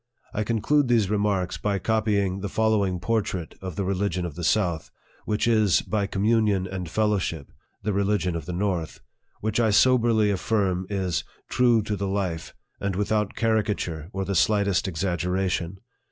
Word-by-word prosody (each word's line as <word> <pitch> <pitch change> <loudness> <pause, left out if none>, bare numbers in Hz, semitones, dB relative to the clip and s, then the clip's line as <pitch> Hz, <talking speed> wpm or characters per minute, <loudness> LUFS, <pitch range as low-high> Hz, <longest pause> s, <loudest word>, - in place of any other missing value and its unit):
I 110 - 0
conclude 120 +6 +2
these 110 -5 +2
remarks 100 -3 0
by 100 -1 0
copying 100 -2 0
the 100 +1 -4
following 105 -5 +1
portrait 95 -4 -2
of 95 -3 -6
the 100 - -1
religion 95 -1 -1
of 85 - -5
the 85 - -7
south, 85 -3 +1 0.4
(which 105 +2 0
is, 110 -5 +3
by 105 -2 -1
communion 105 -1 +2
and 90 -2 -5
fellowship, 95 -8 -1 0.3
the 105 - 0
religion 100 -3 +1
of 80 -3 -5
the - - -3
north,) 90 -3 -2 0.4
which 110 +1 0
I 115 -2 +3
soberly 115 -1 +4
affirm 95 -2 0
is 95 -5 -1
" - - -35
true 120 -3 +4
to 105 0 -2
the 100 0 -2
life," 95 -4 -3 0.2
and 100 -2 -2
with 105 +2 -1
out 105 -2 0
caricature 105 -8 -1
or 95 -2 -3
the 100 - -2
slightest 100 +1 +2
exaggeration. 90 +1 -1
100 Hz, 165 wpm, -25 LUFS, 90-110 Hz, 0.4 s, soberly